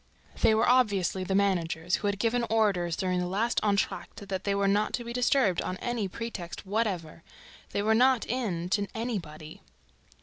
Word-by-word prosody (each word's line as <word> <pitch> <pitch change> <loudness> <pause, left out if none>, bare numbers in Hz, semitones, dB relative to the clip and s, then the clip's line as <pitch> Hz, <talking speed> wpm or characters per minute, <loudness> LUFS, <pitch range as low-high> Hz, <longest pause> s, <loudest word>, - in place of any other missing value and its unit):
"They" 220 - +5
were 220 - +2
obviously 205 -7 +2
the 190 +1 -1
managers, 180 -3 +1
who 205 - -2
had 200 0 0
given 235 +3 +1
orders, 195 -7 +1
during 185 0 -1
the 180 - -1
last 215 +6 0
entr'acte, 205 0 -1
that 190 -1 -3
they 200 -1 +1
were 200 0 +1
not 205 +2 +1
to 240 - -2
be 235 0 -6
disturbed 245 - +2
on 185 - -4
any 240 -3 -2
pretext 195 -4 -6
whatever. 190 -6 -2 0.5
They 200 - -2
were 220 +1 +3
not 250 +1 +4
in 205 -9 -2
to 200 +1 +1
anybody. 170 -10 -5
200 Hz, 175 wpm, -28 LUFS, 185-225 Hz, 0.5 s, They